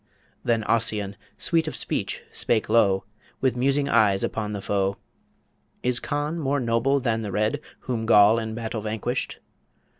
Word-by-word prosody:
Then 115 Hz, -2 st, +1 dB
Ossian, 105 Hz, -3 st, +1 dB, 0.2 s
sweet 165 Hz, -2 st, +2 dB
of -, -, -3 dB
speech, -, -, -3 dB
spake 110 Hz, -2 st, 0 dB
low, 100 Hz, -4 st, +3 dB, 0.4 s
With 130 Hz, -2 st, +1 dB
musing 140 Hz, +3 st, +1 dB
eyes 105 Hz, -6 st, +3 dB
upon 105 Hz, -1 st, -2 dB
the 105 Hz, -, -3 dB
foe, 100 Hz, 0 st, -1 dB, 0.9 s
"Is 125 Hz, -1 st, +2 dB
Conn 150 Hz, +4 st, -2 dB
more 145 Hz, -1 st, 0 dB
noble 120 Hz, +3 st, +2 dB
than 115 Hz, -3 st, 0 dB
The 105 Hz, -2 st, -4 dB
Red, 105 Hz, +2 st, 0 dB, 0.2 s
Whom 115 Hz, -3 st, -3 dB
Goll 105 Hz, 0 st, +6 dB
in 110 Hz, -1 st, -4 dB
battle 115 Hz, -1 st, -4 dB
vanquished?" 110 Hz, 0 st, -3 dB
115 Hz, 150 wpm, -25 LUFS, 105-130 Hz, 0.9 s, Goll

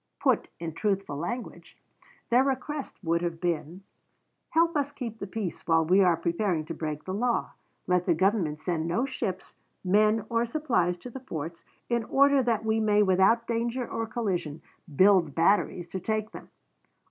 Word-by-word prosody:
Put -, -, +2 dB
in 165 Hz, -1 st, -5 dB
truthful 195 Hz, -4 st, -1 dB
language, 235 Hz, -, -6 dB, 0.5 s
their 245 Hz, +2 st, +5 dB
request 275 Hz, +2 st, -3 dB
would 170 Hz, 0 st, +1 dB
have 170 Hz, -1 st, -3 dB
been, 175 Hz, +1 st, -3 dB, 0.7 s
"Help 335 Hz, 0 st, +2 dB
us 285 Hz, -1 st, 0 dB
keep 235 Hz, -6 st, -6 dB
the 195 Hz, -, -5 dB
peace 190 Hz, -3 st, -5 dB
while 165 Hz, -1 st, +3 dB
we 185 Hz, +5 st, +4 dB
are 175 Hz, -3 st, +4 dB
preparing 170 Hz, -1 st, -1 dB
to 165 Hz, -, -5 dB
break 155 Hz, -2 st, -4 dB
the 185 Hz, -, -5 dB
law. 240 Hz, +3 st, 0 dB, 0.3 s
Let 180 Hz, 0 st, +1 dB
the 170 Hz, -, +4 dB
Government 185 Hz, -4 st, +1 dB
send 160 Hz, 0 st, -2 dB
no 225 Hz, +10 st, 0 dB
ships, 190 Hz, -8 st, -5 dB, 0.3 s
men 210 Hz, +3 st, +3 dB
or 230 Hz, 0 st, +1 dB
supplies 235 Hz, -, 0 dB
to 250 Hz, -, -6 dB
the 265 Hz, -, -7 dB
forts, 165 Hz, -, -6 dB, 0.2 s
in 235 Hz, -1 st, 0 dB
order 280 Hz, +2 st, +4 dB
that 230 Hz, -3 st, 0 dB
we 220 Hz, 0 st, +1 dB
may 210 Hz, -1 st, +3 dB
without 195 Hz, +5 st, +3 dB
danger 235 Hz, +2 st, -2 dB
or 225 Hz, 0 st, -3 dB
collision 185 Hz, -, -3 dB, 0.3 s
build 185 Hz, -4 st, +4 dB
batteries 175 Hz, 0 st, +2 dB
to 190 Hz, -, -4 dB
take 215 Hz, +3 st, -2 dB
them. -, -, -11 dB
195 Hz, 170 wpm, -27 LUFS, 170-235 Hz, 0.7 s, their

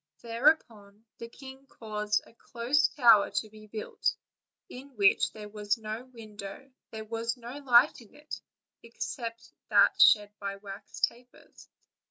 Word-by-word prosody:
Thereupon 230 Hz, -4 st, 0 dB
the 230 Hz, -, -8 dB
king 265 Hz, +2 st, -13 dB
caused 210 Hz, -3 st, -2 dB
a -, -, -19 dB
close 240 Hz, +5 st, +1 dB
tower 230 Hz, -7 st, +5 dB
to 215 Hz, -, -1 dB
be 215 Hz, 0 st, -14 dB
built, 215 Hz, 0 st, -2 dB, 0.5 s
in 265 Hz, +1 st, -12 dB
which 200 Hz, -2 st, +3 dB
there 210 Hz, -1 st, -9 dB
was 210 Hz, +1 st, -2 dB
no 220 Hz, +2 st, -6 dB
window; 220 Hz, 0 st, -10 dB, 0.2 s
there 220 Hz, -1 st, -7 dB
was 230 Hz, +2 st, -3 dB
no 245 Hz, +4 st, -8 dB
light 255 Hz, 0 st, +4 dB
in 225 Hz, -, -18 dB
it, 300 Hz, +1 st, -8 dB, 0.4 s
except 230 Hz, 0 st, -6 dB, 0.2 s
that -, -, +4 dB
shed 205 Hz, -1 st, +6 dB
by 200 Hz, -1 st, -4 dB
wax 195 Hz, 0 st, -10 dB
tapers. 245 Hz, +1 st, -5 dB
230 Hz, 140 wpm, -29 LUFS, 210-250 Hz, 0.5 s, shed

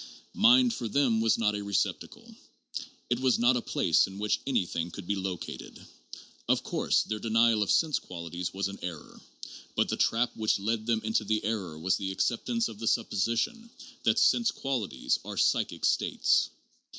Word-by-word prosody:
Mind 245 Hz, +2 st, +5 dB
for 120 Hz, -, -4 dB
them 120 Hz, -2 st, +2 dB
was 115 Hz, 0 st, +3 dB
not 105 Hz, -2 st, +1 dB
a 105 Hz, -, -3 dB
receptacle: 100 Hz, -1 st, -3 dB, 0.8 s
it 120 Hz, -, +2 dB
was 130 Hz, -1 st, +3 dB
not 120 Hz, +2 st, +4 dB
a 125 Hz, -, 0 dB
place -, -, +2 dB
in 95 Hz, 0 st, -10 dB
which 105 Hz, +1 st, 0 dB
anything 90 Hz, -9 st, -1 dB
could 95 Hz, +2 st, -9 dB
be 100 Hz, -, 0 dB
located. 95 Hz, -2 st, -6 dB, 0.7 s
Of -, -, +2 dB
course -, -, +1 dB
their 110 Hz, -1 st, -4 dB
denial 115 Hz, 0 st, +3 dB
of 105 Hz, -, 0 dB
sense 155 Hz, -3 st, +2 dB
qualities 85 Hz, 0 st, -6 dB
was 95 Hz, 0 st, -2 dB
an 100 Hz, 0 st, -8 dB
error. 85 Hz, -3 st, -8 dB, 0.5 s
But -, -, +1 dB
the -, -, -1 dB
trap 120 Hz, +2 st, +1 dB
which 110 Hz, -1 st, +1 dB
led 110 Hz, +2 st, -2 dB
them 115 Hz, -2 st, +1 dB
into 110 Hz, 0 st, 0 dB
the 110 Hz, +1 st, -1 dB
error 100 Hz, -8 st, -3 dB
was 90 Hz, +4 st, +1 dB
their 95 Hz, -1 st, -3 dB
acceptance 230 Hz, -, 0 dB
of 105 Hz, -, -10 dB
the 115 Hz, -, -4 dB
supposition 115 Hz, -, 0 dB, 0.3 s
that -, -, +2 dB
sense 235 Hz, -1 st, +4 dB
qualities 135 Hz, -, -2 dB
are -, -, -7 dB
"psychic -, -, +1 dB
states." -, -, +2 dB
110 Hz, 175 wpm, -29 LUFS, 100-120 Hz, 0.8 s, Mind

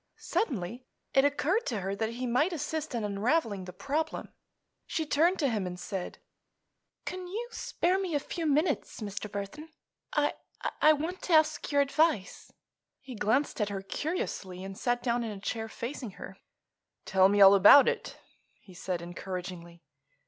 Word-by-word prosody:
Suddenly 245 Hz, -, -2 dB, 0.3 s
it 270 Hz, +1 st, +5 dB
occurred 315 Hz, -, +1 dB
to 220 Hz, -6 st, -2 dB
her 195 Hz, +2 st, -2 dB
that 220 Hz, +2 st, -2 dB
he 250 Hz, +2 st, -4 dB
might 255 Hz, +9 st, +2 dB
assist 310 Hz, -2 st, -3 dB
in 230 Hz, -, -1 dB
unraveling 210 Hz, -, 0 dB
the 180 Hz, -, -7 dB
problem. 285 Hz, -, -3 dB, 0.6 s
She 320 Hz, -, -1 dB
turned 330 Hz, +6 st, +3 dB
to 290 Hz, -, +1 dB
him 210 Hz, -5 st, -1 dB
and 180 Hz, 0 st, -6 dB
said: 185 Hz, 0 st, -5 dB, 0.9 s
"Can 365 Hz, 0 st, -5 dB
you 450 Hz, +6 st, -5 dB
spare 370 Hz, -4 st, 0 dB
me 365 Hz, -5 st, -2 dB
a -, -, +3 dB
few 325 Hz, +3 st, -4 dB
minutes, 300 Hz, +2 st, 0 dB
Mr. 205 Hz, 0 st, -5 dB
Burthon? 205 Hz, +11 st, -6 dB, 0.4 s
I—I 310 Hz, -, +1 dB
want 325 Hz, +5 st, -4 dB
to 355 Hz, -, -1 dB
ask 310 Hz, -1 st, +3 dB
your 285 Hz, 0 st, +4 dB
advice." 280 Hz, -, 0 dB, 0.5 s
He 265 Hz, -1 st, -10 dB
glanced 225 Hz, +4 st, 0 dB
at 210 Hz, -, +1 dB
her 195 Hz, -1 st, -4 dB
curiously 195 Hz, -, -4 dB
and 195 Hz, 0 st, -7 dB
sat 245 Hz, +3 st, -1 dB
down 240 Hz, -1 st, +1 dB
in 230 Hz, -, -3 dB
a 205 Hz, -2 st, -6 dB
chair 220 Hz, +2 st, -3 dB
facing 235 Hz, -2 st, -6 dB
her. -, -, -9 dB, 0.7 s
"Tell 190 Hz, -1 st, +5 dB
me 205 Hz, +1 st, +2 dB
all 195 Hz, 0 st, +10 dB
about 205 Hz, +8 st, +8 dB
it," 475 Hz, 0 st, -2 dB, 0.4 s
he 185 Hz, -, -16 dB
said 175 Hz, -1 st, -4 dB
encouragingly. 175 Hz, -1 st, -7 dB
240 Hz, 165 wpm, -30 LUFS, 195-310 Hz, 0.9 s, all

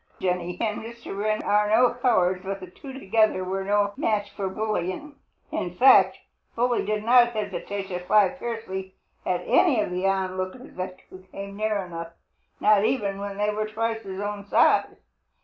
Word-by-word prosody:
Jenny 180 Hz, -1 st, -2 dB
and 215 Hz, -2 st, -1 dB
Mr. 235 Hz, -2 st, -8 dB
Wren 215 Hz, +1 st, -1 dB
are 210 Hz, 0 st, +2 dB
no 240 Hz, +3 st, +4 dB
cowards, 190 Hz, -8 st, +2 dB
but 195 Hz, 0 st, -4 dB
the 185 Hz, -1 st, -10 dB
two 270 Hz, +8 st, -10 dB
together 215 Hz, -6 st, +1 dB
were 190 Hz, +1 st, -2 dB
no 205 Hz, +1 st, +1 dB
match 205 Hz, -2 st, -1 dB
for 195 Hz, -2 st, -3 dB
Bully. 190 Hz, -3 st, -2 dB, 0.5 s
In 175 Hz, 0 st, -3 dB
fact, 195 Hz, -6 st, +6 dB, 0.4 s
Bully 240 Hz, +1 st, +1 dB
did 210 Hz, +1 st, -2 dB
not 240 Hz, +1 st, +5 dB
hesitate 205 Hz, -2 st, -4 dB
to 180 Hz, -1 st, -3 dB
fly 190 Hz, +2 st, +3 dB
fiercely 190 Hz, -7 st, -5 dB, 0.3 s
at -, -, 0 dB
any 280 Hz, -10 st, +4 dB
of 210 Hz, -, -1 dB
the 180 Hz, +2 st, 0 dB
onlookers 190 Hz, +4 st, -3 dB, 0.4 s
who 185 Hz, -, -10 dB
came 200 Hz, 0 st, -7 dB
near 215 Hz, 0 st, 0 dB
enough, 170 Hz, -1 st, -7 dB, 0.5 s
not 210 Hz, -1 st, +4 dB
even 210 Hz, -4 st, 0 dB
when 200 Hz, 0 st, -5 dB
they 210 Hz, +1 st, +1 dB
were 215 Hz, +1 st, -2 dB
twice 225 Hz, +1 st, -2 dB
his 190 Hz, -2 st, -7 dB
own 205 Hz, 0 st, -4 dB
size. -, -, +3 dB
205 Hz, 165 wpm, -25 LUFS, 190-220 Hz, 0.5 s, fact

